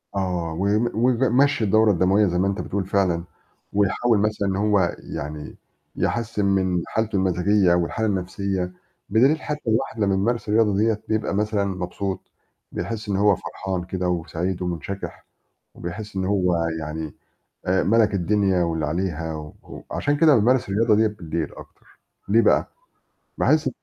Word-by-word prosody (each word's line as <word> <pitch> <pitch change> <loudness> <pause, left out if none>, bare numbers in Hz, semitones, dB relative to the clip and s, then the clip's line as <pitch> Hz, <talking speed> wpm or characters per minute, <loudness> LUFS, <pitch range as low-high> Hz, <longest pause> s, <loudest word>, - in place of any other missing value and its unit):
آه، 90 -4 -1
و 95 +5 -2
و 120 +2 +1 0.2
ويمشّي 130 +2 +2
الدورة 110 +1 +4
الدموية 95 +3 +3
زي 90 0 -1
ما 95 - +2
أنت 100 0 -1
بتقول 100 -1 -3
فعلًا، 95 -3 +1 0.5
ويحاول 105 +3 +2
مثلًا 105 -1 0
إن 95 - 0
هو 100 -4 +2 0.2
يعني 75 0 -6 0.4
يحسِّن 110 -3 -1
من 95 -3 +1
حالته 110 -2 -1
المزاجية 95 0 +3
والحالة 90 +6 0
النفْسية. 95 -1 -2 0.4
بدليل 135 +9 +4
حتى 150 -5 -4
الواحد 110 0 0
لمّا 100 -2 +2
يمارس 115 +2 -1
الرياضة 105 -2 +3
ديّة 110 0 +1
بيبقى 110 -2 0
مثلًا 105 -1 0
مبسوط 95 +1 -4 0.4
بيحس 105 +4 -4
إن 100 - 0
هو 100 0 +4
فرحان 95 0 -4
كده 90 0 -2
وسعيد 90 +1 -2
ومُنشَكِح، 90 +2 -5 0.5
وبيحس 100 +4 -7
إن 95 - 0
هو 90 -3 +1 0.2
يعني 75 0 -5 0.5
آآ 95 +1 +2
مَلَك 110 0 +3
الدنيا 95 -1 +2
واللي 80 -2 -1
عليها 80 -1 -2
و 75 0 -10
عشان 145 0 0
كده 150 -1 +5
بامارس 120 +1 +2
الرياضة 110 +3 +3
ديّة 110 0 +4
بالليل 85 -7 -4
أكتر، - - -16 0.3
ليه 110 +3 +5
بقى؟ - - +3 0.7
باحس - - +3
100 Hz, 150 wpm, -23 LUFS, 90-110 Hz, 0.7 s, كده